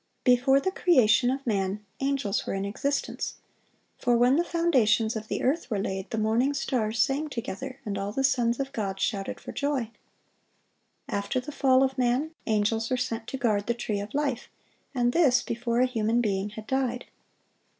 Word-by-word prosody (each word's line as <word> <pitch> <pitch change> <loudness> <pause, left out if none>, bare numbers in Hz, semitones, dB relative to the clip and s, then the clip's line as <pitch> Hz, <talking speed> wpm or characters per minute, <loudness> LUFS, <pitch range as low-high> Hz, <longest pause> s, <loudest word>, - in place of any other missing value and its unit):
Before 255 +2 +5
the 375 +7 -1
creation 245 - +4
of 270 +1 -2
man, 200 -2 -1
angels 275 -6 -1
were - - -1
in 195 0 -2
existence; 275 +8 -2 0.6
for 245 -1 +2
when 245 +3 +4
the 335 - +3
foundations 240 -11 +2
of 220 0 -5
the - - -3
earth 285 +3 0
were 215 - 0
laid, 195 0 -3
"the 225 - -3
morning 230 +6 +1
stars 235 -5 -1
sang 275 +7 +1
together, 260 +2 -5
and 200 -2 -3
all 200 +1 -3
the 270 +5 -1
sons 240 -3 +2
of 275 0 -2
God 195 -5 -3
shouted 195 -1 -2
for - - -8
joy."(898) 275 -6 -1 1.2
After 200 +5 -1
the 265 +4 -7
fall 265 -2 +4
of 265 0 -1
man, 255 +5 +1 0.2
angels 225 +1 +1
were 255 - +1
sent 235 -2 -3
to 265 - -4
guard 215 -5 0
the 235 - +1
tree 215 -4 -2
of 205 +4 -6
life, 280 -5 -1 0.5
and 245 -1 +2
this 285 -7 +4
before 235 +1 -1
a - - +5
human 230 -2 0
being 200 -3 0
had 215 +1 -9
died. 255 -1 -1
240 Hz, 180 wpm, -27 LUFS, 215-270 Hz, 1.2 s, Before